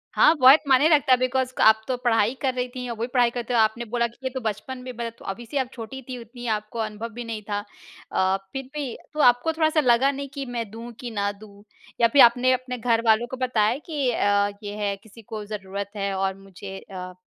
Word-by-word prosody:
हाँ, 325 - +6
बहुत 265 +3 +8
मायने 275 +3 +5
रखता 290 -4 +4
है 255 - +7
बिकॉज़ 255 0 0
क - - 0
आप 220 0 +6
तो 255 - 0
पढ़ाई 225 -1 +3
कर 265 -3 +1
रही 250 0 -2
थीं 250 -1 -5
और 235 - -3
वो - - -7
भी 235 - 0
पढ़ाई 245 -2 +4
कर 245 - -4
रहे - - -3
थे। - - 0
आपने 220 +2 +2
बोला 235 +1 0
कि 235 - -19
ये 260 - -1
तो 260 - -3
बचपन 220 +4 -4
में, 250 0 -8
तो 240 - -18
मतलब 230 0 -8
अभी 235 +5 -6
से 260 +5 -4
आप 260 -2 0
छोटी 260 +3 -8
थी 255 - -4
उतनी 240 +2 -11
आपको 215 +1 -3
अनुभव 215 +1 -4
भी 240 - -6
नहीं 225 -2 -5
था। 205 0 0 0.5
अ, 190 +1 +2 0.2
फ़िर 270 - -3
भी 280 -5 -3 0.2
तो 305 - -6
आपको 245 +6 +4
थोड़ा-सा 315 0 +2
लगा 260 0 +4
नहीं 280 0 -6
कि 280 -2 -4
मैं 235 -4 -4
दूँ 230 +2 -8
कि 240 -2 -6
ना 200 -1 -1
दूँ? 205 0 -15 0.4
या 235 - +7
फ़िर 270 +4 +5
आपने 245 +2 +5
अपने 255 0 -3
घर 230 -1 +1
वालों 225 +2 +4
को 260 - -4
बताया 245 -2 +1
कि 285 -6 -1
अ, 205 -2 +2
ये 205 0 -5
है 200 -1 0
किसी 220 +1 -15
को 215 -1 -7
ज़रूरत 200 -1 -6
है 200 -1 -2
और 190 0 0
मुझे 195 0 -10
अ, 185 -2 -8
235 Hz, 255 wpm, -24 LUFS, 215-255 Hz, 0.5 s, बहुत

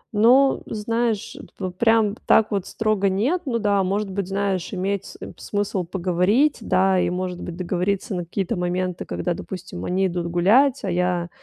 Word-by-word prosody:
Ну, 255 +6 +5
знаешь, 225 0 -2 0.2
п 185 -2 -3
прям 220 +2 +3
так 220 - +4
вот 200 -3 -1
строго 215 -3 0
нет. 255 - 0
Ну 235 - 0
да, 205 -3 +2
может 195 +1 -1
быть, 195 -1 -3
знаешь, 195 -2 -2
иметь 195 0 -2
см - - -10
смысл 205 -2 -2
поговорить, 190 - +1
да, 190 0 +2
и, - - +1
может 180 0 -3
быть, 175 -1 -6
договориться 185 +3 -1
на 180 -1 -2
какие-то 180 +2 -3
моменты, 180 0 -2
когда, 175 - -2
допустим, 165 - -7
они 190 +1 +1
идут 175 -1 -2
гулять, 220 +11 +3
а 190 - -1
я 175 -1 0
195 Hz, 170 wpm, -23 LUFS, 180-215 Hz, 0.2 s, Ну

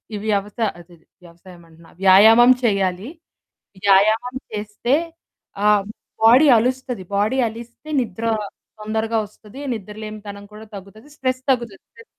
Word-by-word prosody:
ఇవ్యవసా 210 +1 -2
అదది 170 -1 -18 0.2
వ్యవసాయం 175 +1 -16
అంటున్నా. 165 +1 -19
వ్యాయామం 220 +6 +7
చేయాలి. 195 0 0 0.8
వ్యాయామం 215 +6 +3 0.2
చేస్తే 210 +4 -2 0.7
ఆహ్, 210 -2 +4 0.4
బాడీ 250 +7 +7
అలుస్తది 250 -3 -2
బాడీ 215 +6 0
అలిస్తే 235 +6 -12
నిద్ర 225 -2 -5 0.6
తొందరగా 220 +1 -2
వస్తది 215 +5 -15
నిద్రలేనితనం 210 -1 -9
కూడా 215 +1 -11
తగ్గుతది. 200 +6 -12
స్ట్రెస్ 255 0 -2
తగ్గుతది. 235 -6 -2
స్ట్రెస్ 460 - -17
215 Hz, 110 wpm, -20 LUFS, 200-235 Hz, 0.8 s, వ్యాయామం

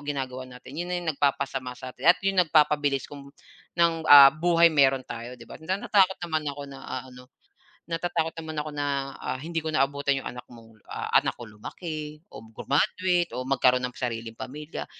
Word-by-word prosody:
ginagawa 130 -3 -5
natin, 125 +1 -13
yun 175 +4 -4
na 180 - -1
yung 175 -2 -2
nag-papasama 135 -3 -1
satin 130 +5 -3
at 175 - +8
yung 195 -1 +3
nagpapabilis 150 -4 +2
kung 140 -1 -11 0.5
ng, 170 -1 +4 0.2
ah, 140 -1 +10
buhay 170 +1 +4
meron 135 -3 +3
tayo 120 +2 -8
di 115 - -13
ba. - - -12
Natatakot 190 +2 +2
naman 155 -3 -2
ako 140 0 -6
na, 140 -1 -10
ah, - - -5
ano, 125 0 -14 0.6
na-tatakot 165 -1 -2
naman 155 -1 -3
ako 155 - -6
na, 145 - -1 0.3
ah, 130 - -4
hindi 165 +2 -5
ko 155 - -2
naabutan 140 -1 +1
yung - - -6
anak 125 0 -9
mong 115 -2 -16
ah, - - -6
anak - - +1
ko 120 -2 -11
lumaki 155 - -7
o 110 +1 -11
grumaduate 175 +9 0
o 125 - -3
magkaroon 125 -1 +3
ng 125 - -17
sariling 115 -2 -4
pamilya, 150 +4 -7
145 Hz, 185 wpm, -26 LUFS, 130-160 Hz, 0.6 s, ah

